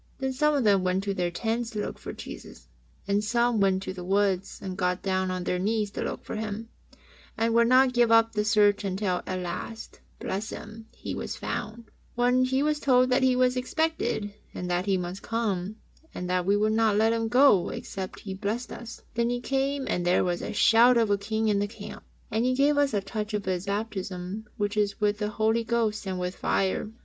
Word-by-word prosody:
Then 265 Hz, -1 st, -2 dB
some 300 Hz, +3 st, +2 dB
of 275 Hz, -, +1 dB
them 200 Hz, -3 st, +4 dB
went 185 Hz, +1 st, 0 dB
to 200 Hz, -1 st, -1 dB
their 180 Hz, -2 st, -1 dB
tents 225 Hz, +6 st, -2 dB
to 220 Hz, -3 st, -5 dB
look -, -, -4 dB
for -, -, -6 dB
Jesus, -, -, -10 dB, 0.4 s
and 200 Hz, +1 st, +1 dB
some 235 Hz, +1 st, +2 dB
went 195 Hz, -1 st, +2 dB
to 185 Hz, -, -4 dB
the 180 Hz, -1 st, -7 dB
woods 195 Hz, 0 st, 0 dB
and 190 Hz, -3 st, -5 dB
got 180 Hz, 0 st, -1 dB
down 190 Hz, -1 st, 0 dB
on 185 Hz, -1 st, -3 dB
their 180 Hz, 0 st, -1 dB
knees 210 Hz, +1 st, 0 dB
to -, -, -5 dB
look -, -, -4 dB
for -, -, -5 dB
Him, 220 Hz, +1 st, -5 dB, 0.7 s
and 225 Hz, 0 st, +1 dB
would 235 Hz, 0 st, +5 dB
not 255 Hz, +1 st, +5 dB
give 240 Hz, -2 st, +3 dB
up 225 Hz, 0 st, +5 dB
the 210 Hz, -1 st, +1 dB
search 210 Hz, -1 st, +3 dB
until 190 Hz, -2 st, -1 dB
at 185 Hz, -, -2 dB
last, 180 Hz, +5 st, -6 dB, 0.2 s
bless 205 Hz, +4 st, -3 dB
Him, 225 Hz, 0 st, -9 dB
He -, -, -6 dB
was -, -, -4 dB
found, 215 Hz, +1 st, -4 dB
and 235 Hz, -1 st, -16 dB, 0.2 s
when 250 Hz, +1 st, +3 dB
He 265 Hz, +2 st, +1 dB
was 300 Hz, 0 st, +1 dB
told 255 Hz, -2 st, +3 dB
that 255 Hz, +2 st, +3 dB
He 260 Hz, -1 st, +4 dB
was 250 Hz, 0 st, +3 dB
expected 255 Hz, -, -1 dB, 0.2 s
and 180 Hz, 0 st, -4 dB
that 175 Hz, +2 st, 0 dB
He 195 Hz, -1 st, +3 dB
must 180 Hz, +2 st, -5 dB
come, 215 Hz, -4 st, -2 dB, 0.4 s
and 180 Hz, -, -4 dB
that 180 Hz, 0 st, 0 dB
we 200 Hz, +1 st, +4 dB
would 215 Hz, +1 st, +2 dB
not 220 Hz, -2 st, +3 dB
let 220 Hz, +1 st, +3 dB
Him 225 Hz, -1 st, 0 dB
go 245 Hz, -6 st, +5 dB
except 190 Hz, -1 st, -6 dB
He 195 Hz, -, -6 dB
blessed 210 Hz, +5 st, -3 dB
us, 235 Hz, -1 st, -9 dB
then 235 Hz, 0 st, +1 dB
He 245 Hz, 0 st, -1 dB
came, 270 Hz, +2 st, -1 dB
and 180 Hz, -, -1 dB
there 175 Hz, +1 st, +3 dB
was 175 Hz, -1 st, -1 dB
a -, -, -4 dB
shout 235 Hz, +3 st, +5 dB
of 225 Hz, -3 st, +2 dB
a 200 Hz, -, +3 dB
King 220 Hz, +2 st, -1 dB
in 205 Hz, -2 st, +2 dB
the 205 Hz, -, 0 dB
camp, 215 Hz, -, -9 dB, 0.3 s
and 220 Hz, +2 st, +1 dB
He 255 Hz, +1 st, +2 dB
gave 285 Hz, +2 st, +3 dB
us 285 Hz, -5 st, +2 dB
a 200 Hz, -, +1 dB
touch 210 Hz, +2 st, -4 dB
of 205 Hz, -, -3 dB
His 185 Hz, +1 st, -2 dB
baptism, 200 Hz, -1 st, -4 dB
which 205 Hz, -1 st, -1 dB
is 205 Hz, -1 st, 0 dB
with 210 Hz, -1 st, +1 dB
the 210 Hz, -1 st, -1 dB
Holy 220 Hz, +2 st, +1 dB
Ghost 225 Hz, -3 st, -1 dB
and 185 Hz, -1 st, -2 dB
with 180 Hz, +1 st, -3 dB
fire. 195 Hz, +2 st, 0 dB
215 Hz, 225 wpm, -27 LUFS, 195-235 Hz, 0.7 s, would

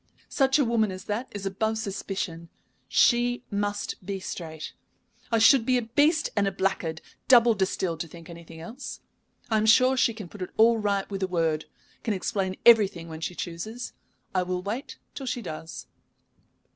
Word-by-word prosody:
Such 270 Hz, -1 st, +3 dB
a 285 Hz, -, +3 dB
woman 230 Hz, -2 st, +2 dB
as 185 Hz, 0 st, -7 dB
that 220 Hz, +6 st, -3 dB
is 200 Hz, -1 st, -7 dB
above 220 Hz, +3 st, -1 dB
suspicion. 190 Hz, -5 st, -4 dB, 0.4 s
She 245 Hz, 0 st, +3 dB
must 205 Hz, -1 st, -2 dB
be 195 Hz, +1 st, -4 dB
straight. 160 Hz, -4 st, -6 dB, 0.6 s
I 230 Hz, -, +3 dB
should 225 Hz, +3 st, +6 dB
be 255 Hz, +2 st, +2 dB
a 245 Hz, -, -1 dB
beast 290 Hz, +8 st, +2 dB
and 205 Hz, -2 st, +2 dB
a -, -, +1 dB
blackguard 170 Hz, -5 st, -1 dB, 0.3 s
double 240 Hz, -2 st, +7 dB
distilled 190 Hz, -4 st, -1 dB
to 165 Hz, -, -3 dB
think 165 Hz, +1 st, -12 dB
anything 170 Hz, -1 st, -11 dB
else. 255 Hz, +10 st, -8 dB, 0.5 s
I 220 Hz, -, +4 dB
am 215 Hz, 0 st, +1 dB
sure 255 Hz, +4 st, +6 dB
she 235 Hz, -3 st, +2 dB
can 210 Hz, -5 st, -7 dB
put 200 Hz, +3 st, -12 dB, 0.2 s
all 230 Hz, +1 st, +5 dB
right 200 Hz, -2 st, 0 dB
with 195 Hz, -1 st, -4 dB
a 190 Hz, -, +1 dB
word, 165 Hz, -4 st, 0 dB, 0.4 s
can 220 Hz, -3 st, -1 dB
explain 190 Hz, -1 st, -2 dB
everything 195 Hz, -8 st, +5 dB
when 160 Hz, 0 st, -8 dB
she 180 Hz, -, -3 dB
chooses. 215 Hz, +10 st, -6 dB, 0.4 s
I 185 Hz, -, +2 dB
will 180 Hz, 0 st, -2 dB
wait 225 Hz, +8 st, -5 dB, 0.2 s
till 270 Hz, -, -7 dB
she 245 Hz, -1 st, -2 dB
does." 160 Hz, -2 st, -7 dB
205 Hz, 175 wpm, -27 LUFS, 180-235 Hz, 0.6 s, double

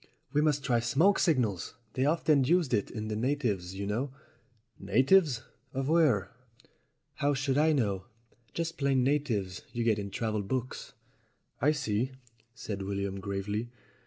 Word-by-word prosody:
"We 150 Hz, -, +3 dB
must 150 Hz, -2 st, +1 dB
try 125 Hz, -3 st, +2 dB
smoke 150 Hz, +12 st, +3 dB
signals. 120 Hz, -, +1 dB, 0.2 s
They're 130 Hz, +3 st, +2 dB
often 155 Hz, -3 st, +3 dB
used 165 Hz, +1 st, +2 dB
by 115 Hz, -, +4 dB
the 110 Hz, -1 st, -4 dB
natives, 110 Hz, -7 st, -1 dB
you 100 Hz, +1 st, -4 dB
know." 115 Hz, +8 st, -1 dB, 0.7 s
"Natives 130 Hz, -, +3 dB, 0.3 s
of 135 Hz, +1 st, -1 dB
where?" 150 Hz, -, +3 dB, 0.9 s
"How 145 Hz, 0 st, +1 dB
should 135 Hz, 0 st, 0 dB
I 155 Hz, +1 st, +4 dB
know? 100 Hz, -10 st, 0 dB, 0.5 s
Just 165 Hz, 0 st, -3 dB
plain 135 Hz, -2 st, +2 dB
natives 120 Hz, -10 st, 0 dB
you 120 Hz, -, -1 dB
get 110 Hz, -2 st, +2 dB
in 100 Hz, -1 st, -4 dB
travel 110 Hz, +1 st, -2 dB
books." 130 Hz, +5 st, -4 dB, 0.7 s
"I 145 Hz, +5 st, +5 dB
see," 130 Hz, -3 st, -1 dB, 0.4 s
said 105 Hz, -4 st, -5 dB
William 100 Hz, 0 st, -3 dB
gravely. 100 Hz, +4 st, -3 dB
125 Hz, 140 wpm, -30 LUFS, 105-145 Hz, 0.9 s, I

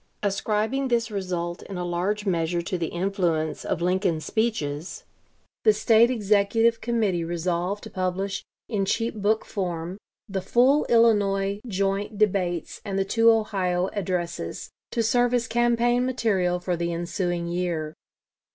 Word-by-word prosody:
Ascribing 215 Hz, +6 st, 0 dB
this 235 Hz, -3 st, 0 dB
result 180 Hz, -3 st, -3 dB
in 195 Hz, -, -7 dB
a 180 Hz, -, -3 dB
large 185 Hz, +5 st, -1 dB
measure 170 Hz, -2 st, 0 dB
to 185 Hz, -, -3 dB
the 170 Hz, -2 st, -1 dB
influence 175 Hz, -4 st, -1 dB
of 170 Hz, -, -2 dB
Lincoln's 180 Hz, -3 st, +1 dB
speeches, 175 Hz, -9 st, -2 dB, 0.6 s
the 215 Hz, -, +6 dB
State 225 Hz, +2 st, +4 dB
Executive 225 Hz, 0 st, +2 dB
Committee 220 Hz, -7 st, 0 dB
resolved 175 Hz, +4 st, -2 dB
to -, -, -9 dB
publish 190 Hz, +1 st, -2 dB, 0.2 s
in 210 Hz, -4 st, -1 dB
cheap 230 Hz, +4 st, 0 dB
book 215 Hz, +1 st, 0 dB
form 180 Hz, -1 st, -4 dB, 0.3 s
the 195 Hz, -1 st, -3 dB
full 255 Hz, +9 st, +3 dB
Illinois 200 Hz, -4 st, +3 dB
joint 200 Hz, +1 st, -1 dB
debates 185 Hz, -5 st, 0 dB
and 195 Hz, -2 st, -3 dB
the 195 Hz, -, +1 dB
two 230 Hz, +3 st, +4 dB
Ohio 190 Hz, -5 st, +1 dB
addresses, 180 Hz, -4 st, -3 dB, 0.2 s
to 230 Hz, -, 0 dB
serve 245 Hz, +2 st, +2 dB
as 240 Hz, -1 st, +1 dB
campaign 240 Hz, +1 st, +2 dB
material 205 Hz, -8 st, +1 dB
for 180 Hz, 0 st, -1 dB
the 170 Hz, 0 st, -2 dB
ensuing 175 Hz, 0 st, -2 dB
year. 170 Hz, -3 st, -2 dB
195 Hz, 140 wpm, -25 LUFS, 175-220 Hz, 0.6 s, the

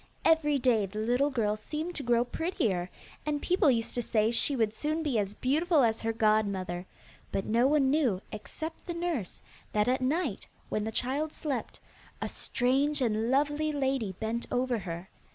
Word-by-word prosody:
Every 310 Hz, -3 st, +4 dB
day 240 Hz, -6 st, +2 dB
the 200 Hz, +3 st, -9 dB
little 245 Hz, +6 st, +2 dB
girl 220 Hz, -6 st, 0 dB
seemed 305 Hz, +10 st, -4 dB
to 305 Hz, -, -4 dB
grow 240 Hz, -1 st, +2 dB
prettier, 225 Hz, -, -1 dB, 0.3 s
and 300 Hz, -1 st, -1 dB
people 350 Hz, -1 st, +3 dB
used 230 Hz, -3 st, +1 dB
to 245 Hz, -, -1 dB
say 220 Hz, -1 st, +2 dB
she 275 Hz, +4 st, +3 dB
would 220 Hz, -4 st, +1 dB
soon 310 Hz, +6 st, -1 dB
be 270 Hz, -8 st, +1 dB
as 200 Hz, 0 st, -2 dB
beautiful 305 Hz, +3 st, +2 dB
as 225 Hz, -1 st, +1 dB
her 225 Hz, -, 0 dB
godmother, 200 Hz, -5 st, +1 dB, 0.4 s
but 195 Hz, -, -1 dB
no 235 Hz, +4 st, +3 dB
one 280 Hz, -2 st, +3 dB
knew, 265 Hz, -11 st, +2 dB
except 315 Hz, -, -7 dB
the 345 Hz, -, -3 dB
nurse, 335 Hz, -, -3 dB, 0.3 s
that 210 Hz, +1 st, +2 dB
at 255 Hz, +1 st, +2 dB
night, 275 Hz, -, -1 dB, 0.2 s
when 215 Hz, 0 st, -1 dB
the 220 Hz, -, -2 dB
child 280 Hz, +7 st, -1 dB
slept, 290 Hz, -6 st, -4 dB, 0.4 s
a -, -, -2 dB
strange 275 Hz, +4 st, 0 dB
and 225 Hz, -2 st, +1 dB
lovely 295 Hz, +3 st, +2 dB
lady 265 Hz, -8 st, 0 dB
bent 230 Hz, +2 st, -2 dB
over 245 Hz, -1 st, +1 dB
her. 175 Hz, -1 st, -6 dB
245 Hz, 175 wpm, -30 LUFS, 215-295 Hz, 0.4 s, Every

